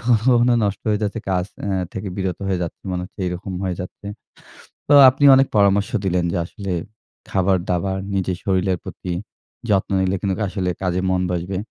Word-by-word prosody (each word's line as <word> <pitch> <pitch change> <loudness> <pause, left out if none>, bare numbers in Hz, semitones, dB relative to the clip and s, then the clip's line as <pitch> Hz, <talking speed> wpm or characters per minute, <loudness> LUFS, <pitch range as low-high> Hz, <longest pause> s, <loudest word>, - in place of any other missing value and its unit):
কখনো 115 -2 +2
কখনো 120 0 +4
নষ্ট 100 -1 -2
হয়ে 105 0 +1
যাচ্ছে 105 +2 -2
কাজ 90 -1 +1 0.2
অ্যা 100 -2 -1 0.2
থেকে 95 +1 -5
বিরত 95 -2 -2
হয়ে 95 - 0
যাচ্ছি, 85 - -6
মনে 90 0 -2
হচ্ছে - - -16
এইরকম 90 +3 -4
হয়ে 90 -1 -1
যাচ্ছে। 90 +2 -9 0.8
তো - - +6 0.2
আপনি 135 +3 -3
অনেক 135 0 +4
পরামর্শ 100 0 +3 0.2
দিলেন 90 -2 +1
যে - - 0
আসলে, 100 +1 -6 0.6
খাবার-দাবার, 95 0 0 0.2
নিজের 95 -2 -1
শরীরের 95 -2 +1
প্রতি 90 - -6 0.6
যত্ন 100 -2 +2
নিলে 95 0 +1
কিন্তু 95 0 -1
আসলে 95 -1 -2
কাজে 90 -1 0
মন 95 -1 +1
বসবে। 90 +2 -3
95 Hz, 175 wpm, -21 LUFS, 90-100 Hz, 0.8 s, তো